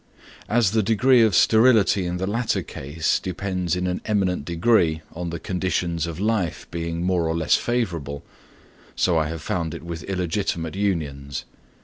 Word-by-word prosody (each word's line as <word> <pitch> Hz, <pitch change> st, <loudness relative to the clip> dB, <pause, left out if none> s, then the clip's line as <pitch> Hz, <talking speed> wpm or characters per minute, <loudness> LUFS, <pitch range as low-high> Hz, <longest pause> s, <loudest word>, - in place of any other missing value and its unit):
As 115 Hz, -3 st, +3 dB
the 110 Hz, 0 st, +2 dB
degree 115 Hz, +4 st, +4 dB
of 110 Hz, -5 st, +4 dB
sterility 110 Hz, -4 st, +4 dB
in 90 Hz, +1 st, -2 dB
the 95 Hz, -, -2 dB
latter 115 Hz, +4 st, -1 dB
case 75 Hz, +4 st, -2 dB
depends 90 Hz, -1 st, -2 dB
in 90 Hz, 0 st, -2 dB
an 90 Hz, 0 st, -2 dB
eminent 95 Hz, -7 st, 0 dB
degree 85 Hz, -2 st, +2 dB
on 85 Hz, +1 st, -4 dB
the 85 Hz, 0 st, -5 dB
conditions 90 Hz, -3 st, -1 dB
of 85 Hz, 0 st, -6 dB
life 105 Hz, -5 st, -1 dB
being 85 Hz, 0 st, -3 dB
more 90 Hz, -2 st, +1 dB
or 80 Hz, 0 st, -1 dB
less 80 Hz, -, +1 dB
favourable, 85 Hz, -, -1 dB, 0.7 s
so 90 Hz, -, +2 dB
I 80 Hz, -, 0 dB
have 80 Hz, 0 st, -6 dB
found 85 Hz, -3 st, -2 dB
it -, -, -9 dB
with 85 Hz, -1 st, -6 dB
illegitimate 90 Hz, -3 st, -2 dB
unions. 75 Hz, -9 st, -2 dB
90 Hz, 160 wpm, -23 LUFS, 85-100 Hz, 0.7 s, degree